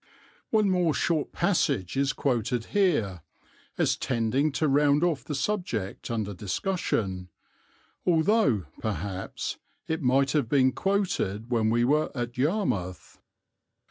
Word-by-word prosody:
One 215 Hz, -2 st, +3 dB
more 175 Hz, -4 st, +2 dB
short 160 Hz, -4 st, 0 dB
passage 150 Hz, -, 0 dB
is 135 Hz, +1 st, +2 dB
quoted 125 Hz, -4 st, -1 dB
here, 145 Hz, -, +1 dB, 0.6 s
as -, -, +2 dB
tending 125 Hz, +5 st, 0 dB
to 155 Hz, +3 st, +1 dB
round 145 Hz, +2 st, +3 dB
off 170 Hz, -5 st, +1 dB
the 150 Hz, -, -4 dB
subject 135 Hz, -, -3 dB
under 110 Hz, -3 st, -2 dB
discussion, 95 Hz, -, -2 dB, 0.7 s
although, 160 Hz, -, +3 dB
perhaps, 100 Hz, -2 st, -4 dB, 0.3 s
it 160 Hz, +1 st, -2 dB
might 135 Hz, +1 st, +3 dB
have 145 Hz, -7 st, 0 dB
been 130 Hz, -2 st, +4 dB
quoted 130 Hz, -, -1 dB
when 110 Hz, -2 st, +2 dB
we 120 Hz, +1 st, +2 dB
were 150 Hz, +4 st, +2 dB
at 120 Hz, 0 st, -3 dB
Yarmouth. 125 Hz, -, -2 dB
135 Hz, 120 wpm, -27 LUFS, 110-160 Hz, 0.7 s, been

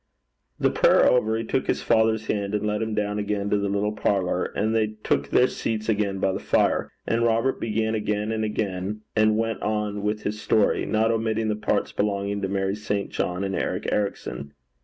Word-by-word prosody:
The -, -, +3 dB
prayer -, -, +5 dB
over, 110 Hz, -3 st, +3 dB
he 115 Hz, -, -2 dB
took 125 Hz, +3 st, -1 dB
his -, -, 0 dB
father's 110 Hz, -1 st, +2 dB
hand 100 Hz, -1 st, -1 dB
and 105 Hz, -, -1 dB
led 105 Hz, 0 st, -1 dB
him 110 Hz, -1 st, -2 dB
down 105 Hz, 0 st, -1 dB
again 100 Hz, -1 st, -2 dB
to 105 Hz, -, +3 dB
the 100 Hz, 0 st, -1 dB
little 100 Hz, +1 st, 0 dB
parlour, 95 Hz, -4 st, 0 dB
and 110 Hz, +2 st, -1 dB
they 110 Hz, -1 st, 0 dB
took 70 Hz, 0 st, +1 dB
their 125 Hz, -, +5 dB
seats 110 Hz, -3 st, -3 dB
again 100 Hz, -2 st, 0 dB
by 95 Hz, 0 st, +1 dB
the -, -, -3 dB
fire; -, -, +1 dB, 0.2 s
and 115 Hz, +1 st, +1 dB
Robert 115 Hz, +3 st, +1 dB
began 110 Hz, 0 st, 0 dB
again 105 Hz, 0 st, -1 dB, 0.8 s
and 110 Hz, 0 st, +4 dB
went 115 Hz, -3 st, -1 dB
on 105 Hz, -1 st, -1 dB
with 105 Hz, +1 st, -2 dB
his 105 Hz, +1 st, -3 dB
story, 110 Hz, -2 st, +2 dB
not 110 Hz, +1 st, +2 dB
omitting 110 Hz, -1 st, 0 dB
the 105 Hz, -, +1 dB
parts 105 Hz, -1 st, -1 dB
belonging 100 Hz, 0 st, -1 dB
to 95 Hz, -, 0 dB
Mary 95 Hz, 0 st, 0 dB
St. 105 Hz, -1 st, -3 dB
John 90 Hz, +2 st, -2 dB
and 95 Hz, -1 st, -2 dB
Eric -, -, -2 dB
Ericson. 70 Hz, -9 st, -3 dB
105 Hz, 195 wpm, -25 LUFS, 100-110 Hz, 0.8 s, prayer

